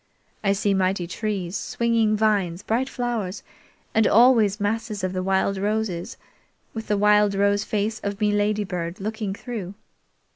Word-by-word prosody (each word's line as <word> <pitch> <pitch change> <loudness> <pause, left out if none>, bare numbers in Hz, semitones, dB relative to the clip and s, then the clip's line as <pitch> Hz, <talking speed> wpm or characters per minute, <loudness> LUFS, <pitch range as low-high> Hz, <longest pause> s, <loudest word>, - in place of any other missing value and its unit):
I 195 -1 +3
see 200 0 +1
mighty 185 -1 +1
trees, 190 -1 -3
swinging 230 -3 +1
vines, 200 -4 +1
bright 250 +4 0
flowers, 230 -6 -3 0.5
and 220 -1 +4
always 225 -3 +5
masses 210 0 -2
of 185 0 -1
the 185 - -1
wild 190 +1 +1
roses, 205 -4 -2 0.6
with 225 -1 -6
the 210 - +1
wild 210 0 +4
rose 200 +1 +2
face 215 +1 -2
of 200 -1 -4
me 210 -1 +2
Ladybird 205 -4 -1
looking 210 -1 -3
through. 205 -5 -6
205 Hz, 145 wpm, -24 LUFS, 195-220 Hz, 0.6 s, always